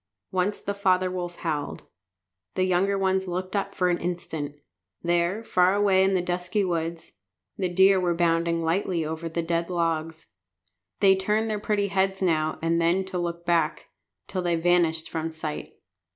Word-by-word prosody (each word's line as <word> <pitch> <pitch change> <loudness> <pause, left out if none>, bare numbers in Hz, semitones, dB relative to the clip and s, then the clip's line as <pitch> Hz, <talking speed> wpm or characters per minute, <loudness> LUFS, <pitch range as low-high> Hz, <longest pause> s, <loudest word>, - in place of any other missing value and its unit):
Once 185 +2 0
the 200 - -2
father 185 -2 +2
wolf 175 -1 -4
howled. 155 -4 -3 0.7
The 185 - +2
young 190 +2 +2
ones 190 0 +1
looked 185 +2 -3
up 200 - -2
for 180 - +2
an 175 - 0
instant. 160 -4 -4 0.5
There, 175 +5 +1
far 185 -2 +3
away 195 -2 +4
in 190 0 +2
the 180 - +1
dusky 180 +3 -1
woods, 165 -1 -3 0.4
the 185 -2 -1
deer 190 +2 +5
were 175 -2 +1
bounding 170 0 +1
lightly 170 0 0
over 160 +2 -4
the 170 +1 -2
dead 170 +1 -1
logs. 165 -2 -2 0.7
They 195 -1 +6
turned 210 +3 0
their 210 - -1
pretty 205 -1 0
heads 190 0 +1
now 155 -4 +1
and 165 +1 +2
then 175 +3 +2
to 190 -1 -4
look 170 0 -4
back, 165 -3 0 0.4
till 185 - -3
they 175 -1 +1
vanished 165 -1 +2
from 160 0 -3
sight. 160 -1 -6
175 Hz, 165 wpm, -26 LUFS, 165-190 Hz, 0.7 s, They